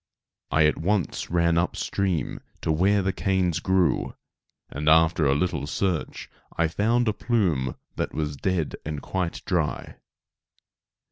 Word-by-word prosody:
I 80 -1 +4
at 75 - +2
once 95 +2 -1
ran 85 -1 +2
up 90 - -1
stream 90 -8 -1 0.2
to - - 0
where 95 +5 +3
the 95 0 0
canes 95 -4 0
grew, 95 -2 +1 0.5
and 75 +2 -1
after 80 -1 +4
a 70 - +3
little 75 -3 -1
search 90 0 -2 0.3
I 85 - +3
found 115 +7 +1
a 110 - +2
plume 85 - 0 0.2
that - - -2
was 75 -2 -3
dead 85 +1 -1
and 75 -1 -4
quite 90 +2 -3
dry. 85 -6 -2
85 Hz, 140 wpm, -25 LUFS, 75-95 Hz, 0.5 s, I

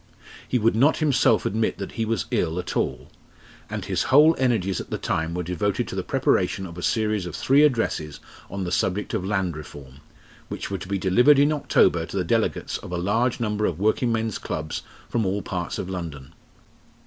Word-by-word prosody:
He 125 - +1
would 115 -1 +2
not 140 +7 +4
himself 135 -7 +3
admit 110 +3 0
that 100 - -6
he 115 - -2
was 110 -6 -1
ill 80 +2 0
at 90 - -4
all, - - -2 0.6
and - - -4
his - - -1
whole 150 +4 +7
energies 110 -8 +1
at - - -11
the - - -2
time 80 +1 -2
were 90 - -2
devoted 90 +3 -1
to - - -5
the - - -1
preparation 95 - 0
of 85 -2 -9
a 90 - -7
series 105 -2 0
of 85 - -6
three 140 +2 +3
addresses 115 - 0 0.3
on 100 -1 -4
the 90 - -3
subject 95 +3 -1
of - - -1
Land 95 -4 -1
Reform, 70 -2 -11 0.5
which - - -6
were 95 - -2
to 85 - -8
be 100 0 -1
delivered 120 +10 +5
in 145 +2 +4
October 150 - +2
to - - -5
the - - +1
delegates - - -1
of - - -10
a 90 - -2
large 110 +8 0
number 105 -2 0
of 85 - -3
working 110 +5 +1
men's 110 -2 -1
clubs 75 0 -4 0.3
from 115 - 0
all 100 +1 -1
parts 90 -2 -4
of - - -4
London. 80 -6 -6
100 Hz, 205 wpm, -24 LUFS, 90-115 Hz, 0.6 s, whole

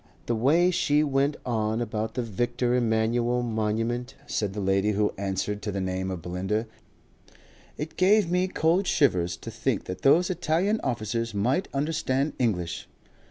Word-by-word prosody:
"The 120 - 0
way 160 +10 +4
she 150 -4 +2
went 140 0 +1
on 110 -2 0
about 110 -1 -3
the 125 - -1
Victor 120 +3 -1
Emmanuele 120 +1 +1
Monument!" 115 +3 -1
said 105 -3 -2
the 105 - -4
lady 95 +2 +1
who 105 +1 +1
answered 100 +1 -2
to 105 - -3
the 100 - -3
name 95 0 -2
of 90 -4 -5
Belinda. 95 +5 -2 1.1
"It 150 +2 -6
gave 200 +1 +4
me 180 +1 +2
cold 180 +1 +1
shivers 90 - +2
to - - -8
think - - -1
that 90 0 -6
those 175 +7 +4
Italian 180 +5 0
officers 115 -1 -2
might 125 - +1
understand 140 -1 0
English." 90 -9 -1
120 Hz, 155 wpm, -26 LUFS, 105-145 Hz, 1.1 s, way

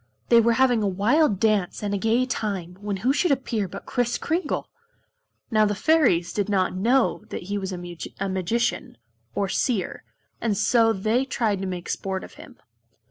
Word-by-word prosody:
They 235 -1 +7
were 230 +1 +3
having 245 -1 +3
a 205 - +1
wild 210 - +2
dance 210 -3 +1
and 205 -1 -1
a - - +1
gay 230 +5 +2
time 195 -8 -3
when 205 -1 -3
who 265 - +4
should 355 +5 +1
appear 240 -7 0
but 195 +2 -9
Kris 245 -1 0
Kringle! 340 +3 -2 0.8
Now 215 -1 +4
the 205 0 0
Fairies 215 - +2
did 205 -1 -1
not 190 -2 +1
know 235 +5 +2
that - - -5
he 200 +3 -3
was 190 -1 -4
a 180 - -4
Magician, 185 +5 -3 0.4
or 200 - 0
Seer, 205 +1 -1 0.4
and 215 -4 0
so 225 +2 +4
they 220 +5 +1
tried 225 -7 -1
to 195 - -3
make 180 -1 -5
sport 190 -1 -3
of - - -11
him. - - -14
210 Hz, 180 wpm, -24 LUFS, 190-240 Hz, 0.8 s, They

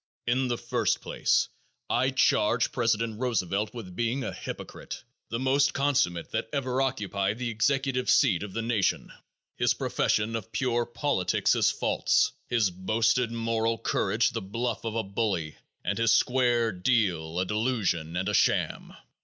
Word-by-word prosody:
In 130 +2 +1
the 120 -1 -1
first 120 -3 0
place, - - +1 0.4
I 130 +2 +2
charge 120 -3 +2
President 115 -2 0
Roosevelt 105 -5 -1
with 95 -7 -8
being 120 +3 -1
a - - -4
hypocrite, - - -7 0.3
the 115 - -2
most 135 +3 +2
consummate 130 -12 +1
that - - -2
ever 130 -2 -1
occupied 105 -6 -1
the 120 -1 -2
executive 130 +2 0
seat 105 -12 +4
of 100 -2 -6
the 115 - -2
nation. 110 -5 0 0.4
His - - +2
profession 110 +2 0
of 115 0 -5
pure 120 0 0
politics 120 -5 +1
is - - +3
false, - - +1 0.2
his 110 -6 +2
boasted 110 +6 +1
moral 115 0 0
courage 110 +1 +1
the 115 -2 -3
bluff 115 +4 -3
of 115 -1 -3
a 115 - 0
bully 95 -6 -2 0.3
and - - -1
his 115 0 +3
"square 120 -3 +3
deal" 90 -5 0
a 95 - +1
delusion 100 -7 -1
and 95 +1 -1
a 105 - 0
sham. - - +1
115 Hz, 155 wpm, -27 LUFS, 105-125 Hz, 0.4 s, seat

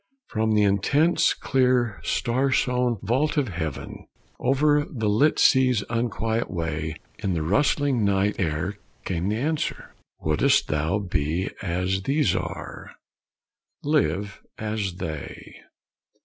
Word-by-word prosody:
From 110 0 0
the 105 - +4
intense, 125 - +3
clear, 125 -5 +1
star 130 +3 0
sown 125 -2 +1
vault 135 +10 +1
of 140 -6 +1
heaven, 80 -5 -5 0.3
Over 145 +2 +3
the 110 -5 -2
lit 115 +9 +3
sea's 130 -5 +4
unquiet 115 -1 -1
way, 80 -2 -3 0.2
In 95 - -1
the 80 - -1
rustling 135 - +2
night 100 0 +1
air 90 +4 -2 0.3
came 90 +1 -1
the 105 - 0
answer: 150 +6 -2 0.3
"Wouldst 75 -1 +2
thou 80 +5 0
BE 90 -2 -1
as 95 +1 -1
these 140 +7 +1
are? - - -6 0.9
LIVE 100 - 0 0.2
as 105 -4 -3
they. 80 -4 -7
105 Hz, 120 wpm, -25 LUFS, 90-130 Hz, 0.9 s, the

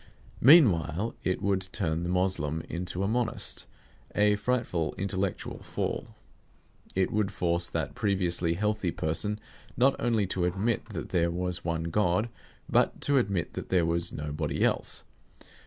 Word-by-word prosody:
Meanwhile, 110 - +5
it 90 - -1
would 95 -1 +1
turn 85 -5 -1
the 85 - -3
Moslem 90 -4 0
into 90 +2 -3
a - - +1
Monist: 110 -1 0 0.5
a 105 0 +4
frightful 105 -8 -1
intellectual 95 -1 -3
fall. - - -3 0.9
It 95 0 +1
would 105 -2 0
force 85 -2 0
that 75 -3 -3
previously 90 -4 0
healthy 105 0 0
person 95 +7 -1 0.4
not 130 +2 +4
only 115 -4 +1
to 90 -1 -1
admit 100 +6 -1
that - - -5
there 85 -2 +2
was 90 0 -1
one 85 -1 -1
God, 90 +5 +1 0.4
but - - +2
to 140 -1 +4
admit 100 -7 -1
that - - -6
there 90 -3 +3
was 85 +1 +3
nobody 75 0 -2
else. - - +1
95 Hz, 140 wpm, -28 LUFS, 85-105 Hz, 0.9 s, Meanwhile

